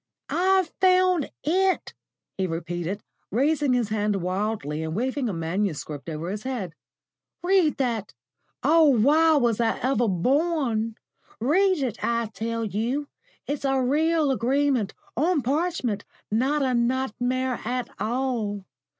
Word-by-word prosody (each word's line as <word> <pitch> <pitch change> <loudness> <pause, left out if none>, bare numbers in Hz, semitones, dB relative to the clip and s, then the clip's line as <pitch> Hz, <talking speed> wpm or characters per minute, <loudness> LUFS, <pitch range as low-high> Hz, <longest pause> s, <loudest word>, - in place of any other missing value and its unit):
"I've 375 -1 +2
found 365 -4 +4
IT," 375 +4 +1 0.4
he 190 -1 -1
repeated, 175 +3 -4 0.3
raising 285 +3 +2
his 240 -4 +1
hand 210 -1 0
wildly 185 -4 -2
and 160 0 -3
waving 255 +2 -1
a - - -2
manuscript 165 -3 -3
over 165 +3 -4
his 205 +1 -4
head. 220 -9 -4 0.7
"Read 360 -4 +3
that 235 -6 -1 0.5
Oh, 325 0 +5
why 300 +5 +5
was 240 -6 +2
I 225 -1 +1
ever 250 -2 +1
born? 235 - +1 0.4
Read 350 - +3
it, 235 -4 -3
I 235 -2 0
tell 230 +2 -2
you. 235 +8 -2 0.4
It's 285 0 -3
a 270 -1 +2
real 300 +3 +2
agreement, 260 -3 +1 0.2
on 305 +2 +1
parchment, 265 - -1 0.3
not 270 +7 +1
a 260 -1 +1
nightmare 255 +1 0
at 250 +2 -2
all. 225 -5 -2
250 Hz, 125 wpm, -25 LUFS, 210-290 Hz, 0.7 s, Oh